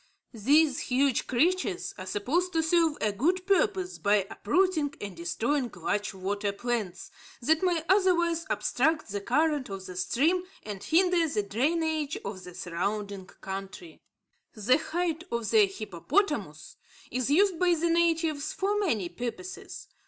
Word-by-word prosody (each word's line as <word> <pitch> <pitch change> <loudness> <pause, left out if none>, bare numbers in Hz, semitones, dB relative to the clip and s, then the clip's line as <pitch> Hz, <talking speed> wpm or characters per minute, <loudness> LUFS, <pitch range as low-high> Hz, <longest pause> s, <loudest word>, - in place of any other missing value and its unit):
These 285 +6 +3
huge 265 0 +1
creatures 360 +8 +1
are 185 - -8
supposed 335 - 0
to 325 -1 +2
serve 325 -2 +2
a 215 - +2
good 350 - 0
purpose 385 -2 +1
by 200 -1 +3
uprooting 315 - +1
and 200 -3 -6
destroying 235 - -1
large 205 0 -2
water 200 +2 -2
plants 205 -4 -3 0.3
that 315 +6 +2
might 345 -4 +1
otherwise 345 -4 +3
obstruct 315 -5 +1
the 205 0 -3
current 295 +3 +1
of 195 -1 -6
the 185 - -8
stream 310 - +1 0.2
and 205 -2 -7
hinder 350 0 +3
the 215 -8 -1
drainage 310 - 0
of 185 -3 -6
the 180 -1 -10
surrounding 200 +2 -3
country. 195 - -8 0.5
The 245 +7 +3
hide 335 0 -2
of 235 -2 -2
the 425 -2 +6
hippopotamus 215 - -2 0.3
is 255 0 -1
used 365 +3 +3
by 355 -1 +4
the 335 +1 0
natives 325 -3 +1
for 410 +2 0
many 225 - 0
purposes. 245 - -7
295 Hz, 140 wpm, -28 LUFS, 205-345 Hz, 0.5 s, the